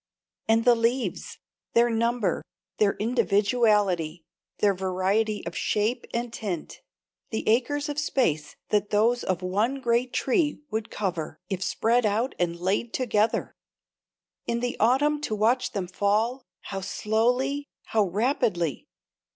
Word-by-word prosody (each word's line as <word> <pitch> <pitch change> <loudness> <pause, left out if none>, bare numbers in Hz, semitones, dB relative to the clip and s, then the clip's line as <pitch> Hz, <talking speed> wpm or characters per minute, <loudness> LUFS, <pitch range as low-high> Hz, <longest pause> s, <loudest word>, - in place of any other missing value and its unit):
And 225 +1 +3
the 245 - +7
leaves 235 +2 -1 0.4
their 235 0 +4
number, 230 -1 0 0.4
their 205 -2 +4
individuality, 205 -7 +1 0.3
their 205 -1 +3
variety 190 +3 0
of 170 - -5
shape 215 +4 0
and 235 0 -3
tint, 190 -9 -5 0.5
the 220 - -3
acres 275 +6 +2
of 295 0 -2
space 160 - 0
that 205 -1 +1
those 230 +4 +2
of 185 -1 -1
one 210 +9 0
great 240 0 +1
tree 295 +3 +1
would 220 0 -2
cover 180 -6 -3
if 190 -2 -3
spread 230 +6 +2
out 220 +5 +1
and 170 -1 -1
laid 195 +6 -1
together! 220 -3 +1 0.9
In 235 0 0
the 245 0 -2
autumn 290 +6 +3
to 220 - -2
watch 245 +4 +1
them 195 -4 -2
fall 210 +7 0 0.2
how 195 -1 -5
slowly, 250 +8 0 0.2
how 215 -2 +1
rapidly! 200 - 0
220 Hz, 130 wpm, -26 LUFS, 195-245 Hz, 0.9 s, the